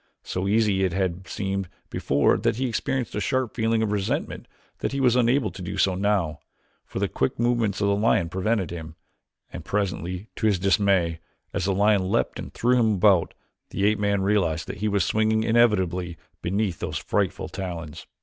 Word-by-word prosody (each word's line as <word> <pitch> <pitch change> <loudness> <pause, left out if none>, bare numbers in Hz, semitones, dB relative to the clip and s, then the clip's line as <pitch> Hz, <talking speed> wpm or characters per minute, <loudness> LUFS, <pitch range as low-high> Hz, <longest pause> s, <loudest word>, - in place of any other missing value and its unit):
So 95 +1 -3
easy 105 -2 +2
it 95 -3 0
had 95 -1 -2
seemed 95 -2 -3 0.2
before 70 +1 +2
that 115 0 +1
he 130 +3 -1
experienced 130 +1 -2
a - - -2
sharp 130 +3 0
feeling 115 -1 +1
of 105 - -1
resentment 100 -2 -2 0.3
that - - -2
he 140 - -1
was 125 -3 +4
unable 125 +2 +2
to - - -10
do 95 +2 -5
so 95 -1 +3
now, 95 -6 0 0.5
for - - -7
the - - +1
quick 65 - -1
movements 120 -4 +1
of 100 - +2
the 100 - +3
lion 105 -4 +2
prevented 95 +2 -1
him, 80 -2 -7 0.6
and - - -6
presently, 95 -1 -3
to 110 - +1
his 100 -3 +3
dismay, 95 -3 +2 0.3
as 100 -4 -1
the 95 -1 +1
lion 100 -2 +3
leaped - - 0
and - - -7
threw 125 +1 +2
him 110 -3 +3
about, 95 -3 +3 0.3
the 100 - -1
ape 105 0 +2
man 100 -1 +1
realized 90 -6 +1
that - - -6
he 105 +2 -1
was 100 -2 +1
swinging 110 0 +1
inevitably 95 -7 +2 0.2
beneath 95 -1 -1
those - - -3
frightful - - -1
talons. 85 -3 -6
100 Hz, 190 wpm, -25 LUFS, 90-110 Hz, 0.6 s, was